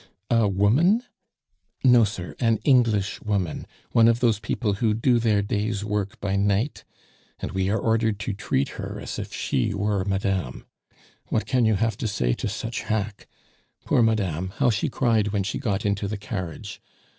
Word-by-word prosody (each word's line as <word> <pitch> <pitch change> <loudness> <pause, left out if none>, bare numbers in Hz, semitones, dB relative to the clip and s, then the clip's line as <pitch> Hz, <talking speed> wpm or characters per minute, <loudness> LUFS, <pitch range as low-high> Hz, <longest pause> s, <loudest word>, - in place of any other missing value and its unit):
"A 115 -2 +4
woman?" 125 - +3 0.8
"No, 125 -3 +6
sir, 90 -4 -6
an 115 -3 +2
English 115 -8 +2
woman 100 -6 -2 0.2
one 115 -1 +5
of 115 0 +3
those 115 -4 +2
people 105 -1 -1
who 110 -2 +2
do 120 +2 +3
their 110 -3 +2
day's 105 0 -2
work 105 -2 -2
by 100 -1 -1
night, 100 +7 0 0.6
and - - -4
we 95 0 0
are 105 - +1
ordered 110 -2 +1
to 105 - -2
treat 70 -7 -1
her - - -5
as - - -5
if - - -6
she 65 - -1
were 100 -1 0
madame. 95 -1 -2 0.6
What 110 - 0
can 125 -2 +2
you 110 -1 +3
have 115 +3 0
to 125 - -2
say - - 0
to - - -3
such 115 +2 -4
hack! 105 -1 -3 0.6
Poor - - +3
Madame, 95 -6 0
how 120 - +3
she 105 - -1
cried 115 -5 +1
when 100 -1 0
she 95 - -3
got 105 -7 -1
into 100 0 0
the 105 +1 -3
carriage. 95 -5 -6
105 Hz, 175 wpm, -24 LUFS, 100-115 Hz, 0.8 s, No